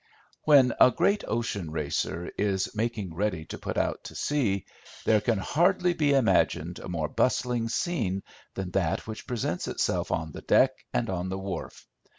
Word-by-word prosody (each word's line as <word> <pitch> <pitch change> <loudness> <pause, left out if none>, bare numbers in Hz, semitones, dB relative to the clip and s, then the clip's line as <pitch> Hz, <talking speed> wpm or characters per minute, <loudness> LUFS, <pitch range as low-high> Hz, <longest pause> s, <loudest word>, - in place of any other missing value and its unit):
When 135 -5 +6
a - - +9
great 200 +9 +1
ocean 105 -7 -2
racer 80 +2 -2
is 95 -2 0
making 110 -5 -2
ready 90 -3 -1
to - - -8
put - - -4
out - - -1
to - - -8
sea, 110 - 0 0.4
there 110 -2 +4
can 110 +1 +1
hardly 175 - +2
be 150 -4 +2
imagined 90 - +2
a - - -8
more 80 -3 -1
bustling 120 +1 0
scene 115 - -1 0.3
than 95 -2 -4
that 95 0 0
which 110 -1 -7
presents 110 -8 -2
itself - - -1
on 80 -1 -1
the - - -8
deck 130 - +4 0.2
and 120 - 0
on 95 -1 -2
the 95 - -3
wharf. 95 -3 -6
105 Hz, 165 wpm, -28 LUFS, 90-125 Hz, 0.4 s, a